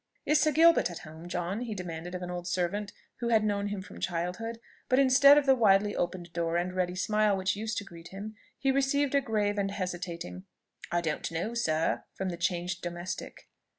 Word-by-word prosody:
"Is 300 0 +4
Sir 310 - +3
Gilbert 330 - +5
at 175 - -7
home, 160 +3 -10
John?" 175 +3 -2
he 230 -4 -4
demanded 175 -1 -6
of 180 - -5
an 180 - -5
old 175 0 -5
servant 185 +3 -1 0.3
who 235 - -3
had 220 -2 +4
known 205 -1 0
him 200 -2 -4
from - - -11
childhood; 180 +7 -3 0.3
but 255 - +4
instead 275 +2 +7
of 295 - +3
the 270 - +6
widely 205 -4 +4
opened 175 -1 -3
door, 170 0 0
and 180 +1 -1
ready 180 -1 -1
smile 210 +1 +2
which 190 +2 0
used 220 +1 -3
to - - -2
greet 170 -4 -12
him, 200 +4 -7 0.2
he 270 - +2
received 275 +1 +1
a 280 - +4
grave 210 -4 0
and 195 0 0
hesitating 175 - -5 0.5
"I 175 0 +1
don't 155 -1 -2
know 175 +8 -2
sir," 155 - 0
from 190 -1 -2
the 175 - -4
changed 175 0 -1
domestic. 175 +1 -6
190 Hz, 205 wpm, -29 LUFS, 175-220 Hz, 0.5 s, instead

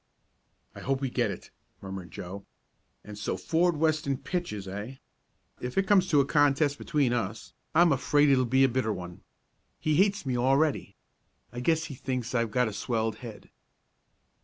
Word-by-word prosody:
"I - - -10
hope 135 0 -1
we 135 -2 -2
get - - +1
it," - - -8 0.3
murmured 95 -2 -7
Joe. 95 +3 -8 0.6
"And 105 0 -9
so 105 - -2
Ford 165 - +1
Weston 155 -3 +1
pitches; 130 - -4
eh? 105 +7 -6 0.6
If 125 +5 -6
it 195 - +3
comes 190 -2 +4
to 150 - +4
a 140 - +4
contest 145 0 +2
between 145 -6 +1
us 105 -5 -3 0.2
I'm 170 0 +6
afraid 145 +2 +3
it 135 - +5
will 130 - +2
be 130 +3 +3
a - - +6
bitter 125 -3 0
one. 90 -3 -7 0.6
He 155 -1 +1
hates 200 -1 +2
me 130 -2 -1
already. 135 -3 +1 0.6
I 120 - -5
guess 160 +5 +1
he 170 - -6
thinks 125 -2 -4
I've 115 -2 +1
got 125 +2 +1
a 110 - -4
swelled 110 -1 -1
head." 115 -3 -10
130 Hz, 175 wpm, -28 LUFS, 110-150 Hz, 0.6 s, I'm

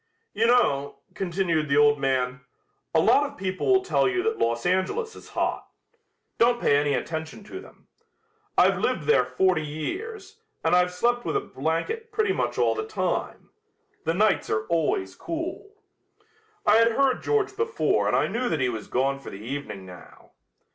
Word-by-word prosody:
"You 225 +3 +2
know," 145 - +2 0.2
continued 170 -5 -1
the 140 - +3
old 145 0 +5
man, 130 -1 0 0.5
"a - - +3
lot 285 - +4
of - - -16
people 185 0 -3
will 380 0 +4
tell 390 - +2
you 370 -1 -1
that 445 +1 -1
Los 115 0 0
Angeles 405 - 0
is - - -13
hot. - - -2 0.7
Don't 240 +1 +4
pay 145 - +3
any 145 0 +1
attention 160 +5 -5
to 375 - -8
them. - - -16 0.7
I've - - +4
lived - - 0
there 455 - +4
forty 185 -4 +1
years, 380 - -6 0.2
and 160 +2 +3
I've 180 0 +3
slept 240 +7 0
with - - 0
a - - -1
blanket 445 - -3
pretty 425 -2 +1
much - - -2
all - - +3
the 430 0 -4
time. 440 - -3 0.5
The 165 +1 0
nights 210 +1 +2
are 110 0 0
always 150 - 0
cool." 335 +5 -5 1.0
I 210 +1 +6
had 230 0 +4
heard 270 0 +2
George 430 -2 0
before 460 +2 +1
and - - +2
I - - +3
knew 245 +2 -2
that 160 - -1
he 130 -1 +1
was 110 -3 -5
gone 135 +2 0
for - - -9
the 100 +3 -9
evening 130 -7 -6
now. 90 -1 -14
185 Hz, 175 wpm, -25 LUFS, -, 1.0 s, I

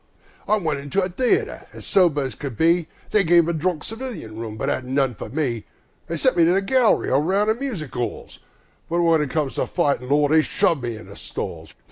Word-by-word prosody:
I 215 - +3
went 155 -7 -1
into 145 +8 -1
a 185 - -1
theatre 245 +7 0
as - - -9
sober 170 -7 +3
as 130 -3 -4
could 130 -1 -7
be, 165 0 +3 0.2
They 210 - +4
gave 170 -1 +5
a 170 - 0
drunk 160 0 -1
civilian 225 - -6
room, 110 -1 -6
but - - -3
'adn't 130 0 -2
none 135 -3 +2
for - - -8
me; 130 -6 -2 0.4
They 170 - -3
sent 255 - +2
me 170 - +6
to 170 +2 +4
the 195 - +2
gallery 250 +2 +3
or 135 +2 +4
round 195 +6 +1
the - - +3
music 220 - -5
'alls, 120 -1 -4 0.5
But 170 +1 +1
when 165 -2 +4
it 150 - -2
comes 150 -1 -1
to - - 0
fightin', 140 -7 0
Lord! 145 0 +3
they'll 160 0 +6
shove 165 -2 +1
me 120 -1 -3
in 110 - -10
the - - -12
stalls! - - -7
160 Hz, 225 wpm, -22 LUFS, 140-185 Hz, 0.5 s, me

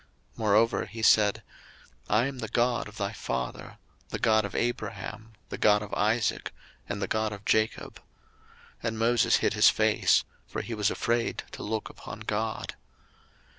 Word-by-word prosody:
02:003:006 - - -30
Moreover 110 +1 +3
he 115 - -8
said, 105 -2 +4 0.7
I 110 +4 +3
am 135 -1 -4
the 110 - -4
God 120 +1 +1
of 105 - -12
thy 100 +1 -2
father, 65 - -4 0.3
the - - -3
God 110 -1 +3
of 100 - -7
Abraham, 115 -2 -3 0.2
the - - -6
God 105 0 +4
of 105 - -9
Isaac, 110 +1 0 0.4
and 100 0 -3
the 95 - -2
God 110 +1 0
of 100 -1 -9
Jacob. 110 0 0 0.8
And 115 -1 -2
Moses 115 +1 +3
hid - - +1
his - - +6
face; - - +3 0.2
for - - -4
he 120 - -5
was 105 -2 +1
afraid 115 0 -1
to - - -8
look 110 0 -3
upon - - -10
God. 110 +1 -3
110 Hz, 165 wpm, -28 LUFS, 105-115 Hz, 0.8 s, his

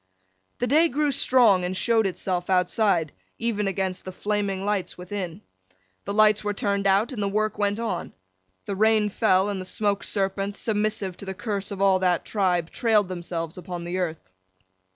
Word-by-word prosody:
The 245 - 0
day 310 +7 +4
grew 295 +1 +1
strong, 235 -8 +4
and 180 +1 -2
showed 225 -2 +2
itself 180 -1 -3
outside, 180 -3 +2 0.3
even 220 -3 -1
against 190 -1 -2
the 185 - -6
flaming 200 -1 -2
lights 205 -3 -1
within. 180 0 -6 0.6
The 200 - -3
lights 215 0 +5
were 205 0 -2
turned 200 -3 0
out, 200 +6 +3
and 235 -5 -4
the 200 - +1
work 215 +1 -1
went 205 +1 0
on. 215 -7 -3 0.5
The 200 - -3
rain 215 +1 +3
fell, 190 -2 +2
and 200 -2 -3
the - - -7
Smoke 200 +1 -1
serpents, 195 0 -2
submissive 210 -3 -1
to - - -8
the 190 0 -5
curse 200 -2 -3
of 195 -1 -2
all 190 -1 +4
that 180 -2 +1
tribe, 180 -5 0
trailed 215 -5 +2
themselves 170 -2 -4
upon 175 0 -6
the 175 +2 -3
earth. 160 - -4
200 Hz, 175 wpm, -25 LUFS, 185-215 Hz, 0.6 s, lights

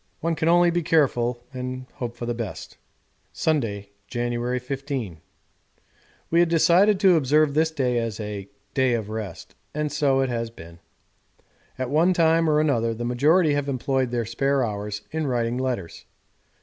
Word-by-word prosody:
One 165 +1 0
can 160 0 -1
only 175 0 +5
be 175 +1 0
careful 125 -7 +1
and 130 0 -5
hope 120 -4 -5
for 120 - -6
the 120 - -1
best.' 115 -4 -6 0.6
Sunday, 105 -10 -1 0.2
January 120 0 -2
15. 130 - -4 1.1
We 165 - +4
had 175 -1 +4
decided 180 +5 +4
to 190 -4 +6
observe 150 0 +3
this 160 +2 +2
day 130 -6 0
as 115 -2 -3
a 105 -2 -6 0.2
'day 130 -2 +2
of 110 -3 -4
rest,' 110 -5 -6 0.2
and 150 -1 -1
so 140 -2 +2
it 135 - 0
has 115 -1 -2
been. 85 -6 -13 1.0
At 130 0 -3
one 165 +5 +4
time 165 -1 +3
or 150 0 +3
another 115 -7 +1
the 120 +2 -4
majority 150 +7 +3
have 145 0 -1
employed 130 -1 0
their 120 -1 -1
spare 135 +4 0
hours 105 -1 -5
in 160 -1 -2
writing 120 -1 -1
letters. 125 -10 -4
130 Hz, 160 wpm, -24 LUFS, 115-155 Hz, 1.1 s, to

